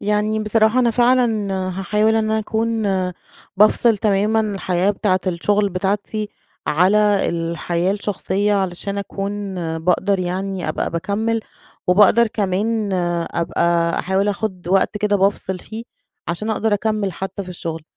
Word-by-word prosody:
يعني 210 +1 0
بصراحة 220 +2 +2
أنا 240 -2 +3
فعلًا 240 -4 +2 0.3
هاحاول 210 +3 +2
إن 220 -1 +1
أكون 220 +1 -1 0.7
بافصِل 215 +2 +4
تمامًا 210 +2 +2
الحياة 195 -3 0
بتاعة 190 -2 0
الشغل 200 +3 +1
بتاعتي، 205 +3 -2 0.4
على 200 +5 +3
الحياة 170 +2 -1
الشخصيّة 205 0 -1
علشان 195 +1 -2
أكون 200 0 -4 0.2
باقدر 185 +4 +1
يعني 185 +1 -3
أبقى - - -2
باكمّل 215 +6 -1 0.5
وباقدر 210 +5 +5
كمان 210 0 -1
آآ 175 -2 0
أبقى 170 0 +1
أحاول 190 +2 0
آخد 195 -4 -3
وقت 195 +2 +2
كده 205 0 +1
بافصل 190 -1 0
فيه، 225 +4 -8 0.4
عشان 190 +6 -2
أقدر 220 -1 +1
أكمّل 210 -2 -1
حتّى 190 +2 -5
في 185 - -12
الشغل 165 -3 -5
200 Hz, 125 wpm, -20 LUFS, 185-215 Hz, 0.7 s, وباقدر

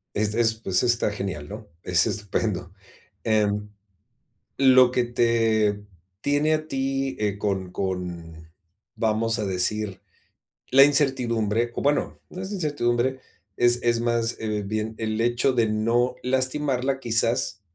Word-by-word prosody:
es 105 0 0
es, 115 -1 +2
pues 95 -5 0
está 120 -3 +1
genial, 95 -8 -5
¿no?, 105 +5 -9 0.2
es 90 -2 +3
estupendo. 95 -3 -2 0.5
Em, 105 -1 +1 0.9
lo 130 -2 +6
que 125 -1 +1
te 115 -3 +1 0.4
tiene 145 +4 +2
a 155 0 -2
ti, 135 0 -2
eh, 105 -2 -1
con 95 -3 -2
con, 85 -4 -5 0.4
vamos 115 +1 0
a 105 - -1
decir, 100 +2 -1 0.7
la 135 +1 +8
incertidumbre, 120 -6 +1
o - - -2
bueno, 145 +1 0
no 180 - -7
es 190 +1 -6
incertidumbre, 130 -8 0 0.4
es 120 0 +4
es 120 -1 +2
más, 115 0 0
eh, 105 -2 -2
bien 110 +2 -3
el 110 -1 -2
hecho 120 +3 +2
de 115 -3 +2
no 115 +3 +1
lastimarla, 130 +1 0
quizás, 115 -3 0
115 Hz, 130 wpm, -24 LUFS, 105-130 Hz, 0.9 s, la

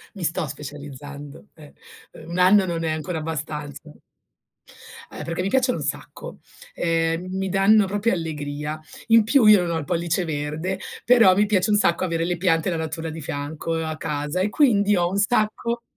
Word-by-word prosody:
Mi 190 - -7
sto 160 -1 0
specializzando, 145 +2 -8
eh. 150 -2 -15 0.4
Uhm, 160 +1 -12
1 175 - -4
anno 190 +2 +5
non 170 -2 -3
è 160 - -1
ancora 160 +2 -3
abbastanza. 150 -1 -5 1.2
Eh, - - -8
perché 170 +2 -3
mi 185 - -1
piacciono 255 +1 +1
un 150 - -3
sacco. 150 - -4 0.4
Ehm, 165 +1 -1
mi 190 - -2
danno 195 +2 +4
proprio 205 +4 0
allegria. 150 -2 -4 0.3
In 230 -1 +6
più 230 +2 +3
io 210 -3 +7
non 170 - -3
ho 165 - -1
il 145 - -6
pollice 175 +1 0
verde, 160 +5 -3 0.3
però 230 -6 +6
mi 205 +2 +3
piace 205 0 +2
un 210 - +4
sacco 170 -4 +2
avere 165 -2 -1
le 175 - -1
piante 165 -2 +1
e - - +1
la 170 - -2
natura 160 0 -3
di 160 0 -7
fianco 145 +3 -3
a 160 -1 -3
casa 150 +4 -3
e 200 - +1
quindi 210 -6 +3
ho 175 0 +1
un 195 - -3
sacco 225 +2 0
165 Hz, 190 wpm, -23 LUFS, 155-195 Hz, 1.2 s, io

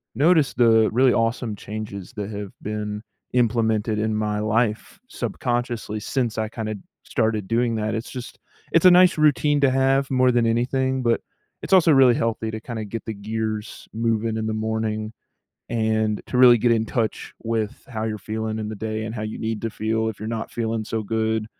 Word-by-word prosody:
noticed 150 0 +3
the 110 -2 +5
really 125 +2 +4
awesome 115 -1 0
changes 100 -2 -7
that 100 -1 -3
have 100 -1 -6
been 105 0 -4 0.3
implemented 110 -3 +1
in 110 0 0
my 105 -1 -1
life 110 - -1
subconsciously, 120 - -3
since 120 -1 -1
I 110 -1 -1
kinda 110 -1 -4 0.3
started 110 -3 -1
doing 115 +1 +1
that, 110 0 -1
it's 115 - -4
just 125 -1 -8 0.3
it's 165 +2 +3
a 185 - +10
nice 180 0 +6
routine 145 -1 +3
to 135 -2 +4
have 135 +1 +2
more 130 -1 +4
than 120 -1 +2
anything, 130 +3 0
but 115 -1 +2 0.4
it's - - -2
also 180 -3 +6
really 135 -4 +6
healthy 115 -1 -1
to 110 - -5
kinda 110 -1 -6
get 110 +2 -6
the 110 - -4
gears 110 +1 -4
moving 115 0 0
in 110 - -2
the 110 - -1
morning, 110 0 -2 0.6
and 110 -2 0
to 125 - -2
really 125 -1 +8
get 120 +2 +2
in 110 -1 +2
touch 110 -1 -2
with 110 -2 -2
how 110 -5 -4
you're 110 -1 -2
feeling 110 +2 -3
in 105 -1 -4
the 110 - -5
day 110 +1 -3
and 110 +1 -5
how 110 - -4
you 110 0 -5
need 110 -1 -3
to 115 - -2
feel 110 +1 -1
if 110 - -8
you're 110 - -5
not 110 0 -4
feeling 115 -1 -2
so 110 +1 -3
good, 110 0 -1
110 Hz, 190 wpm, -23 LUFS, 110-120 Hz, 0.6 s, a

